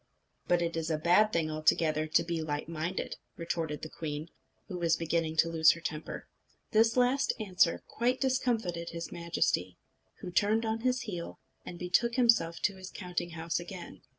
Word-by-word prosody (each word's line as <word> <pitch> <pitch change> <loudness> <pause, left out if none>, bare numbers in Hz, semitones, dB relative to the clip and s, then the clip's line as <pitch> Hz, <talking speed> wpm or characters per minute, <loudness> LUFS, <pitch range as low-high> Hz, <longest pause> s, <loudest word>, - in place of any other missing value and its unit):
"But 175 -1 +3
it 170 -1 -2
is 165 0 -2
a 155 - +1
bad 180 +7 +4
thing 160 -4 0
altogether 155 0 +2
to 155 - +3
be 170 -1 -2
light 150 -1 -3
minded," 165 +3 -3 0.2
retorted 165 -3 -3
the 155 - -5
queen, 155 0 -5 0.4
who 180 -3 -5
was 165 -2 +3
beginning 165 -1 -1
to 165 - +5
lose 160 -1 +5
her 170 - -9
temper. 155 -2 -5 0.4
This 225 +2 +4
last 250 +2 +3
answer 185 -5 +2
quite 250 +3 0
discomfited 230 -10 0
his 170 0 -6
Majesty, 170 - -1 0.4
who 180 - -6
turned 215 +5 +2
on 220 0 -1
his 250 +1 +1
heel, 180 -7 -6 0.3
and 175 - -6
betook 210 +7 +1
himself 230 -10 +3
to 200 -1 0
his 185 0 -8
counting 175 -2 -4
house 165 +1 -1
again. 175 +1 -9
170 Hz, 175 wpm, -31 LUFS, 160-215 Hz, 0.4 s, to